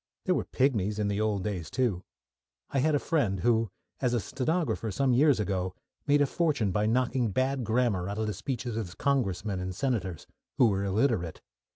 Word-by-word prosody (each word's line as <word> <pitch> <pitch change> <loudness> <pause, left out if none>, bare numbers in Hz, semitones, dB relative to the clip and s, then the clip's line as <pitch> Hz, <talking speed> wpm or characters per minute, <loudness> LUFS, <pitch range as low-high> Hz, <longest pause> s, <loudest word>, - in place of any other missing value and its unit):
There - - +3
were - - -1
pigmies 105 -6 +1
in 105 -1 0
the 100 +1 0
old 105 -3 0
days, 90 -7 -3
too. 120 -8 0 0.7
I 135 - +1
had 150 +3 +3
a - - +5
friend 120 - 0
who, 115 -2 +2 0.3
as 125 -2 +1
a - - +2
stenographer 140 - -1
some 130 +5 +1
years 140 -1 +4
ago, 95 -3 -1 0.3
made 145 0 +5
a - - +3
fortune 140 - 0
by 105 +3 +1
knocking 125 0 +1
bad 130 +5 0
grammar 110 -5 +1
out 100 - -4
of 110 - 0
the 105 - -2
speeches 115 +3 -4
of 100 -6 -5
Congressmen 105 -8 0
and 90 0 -4
Senators, 100 - -2 0.3
who 120 - +6
were 100 -1 0
illiterate. 100 - 0
110 Hz, 190 wpm, -29 LUFS, 100-130 Hz, 0.7 s, who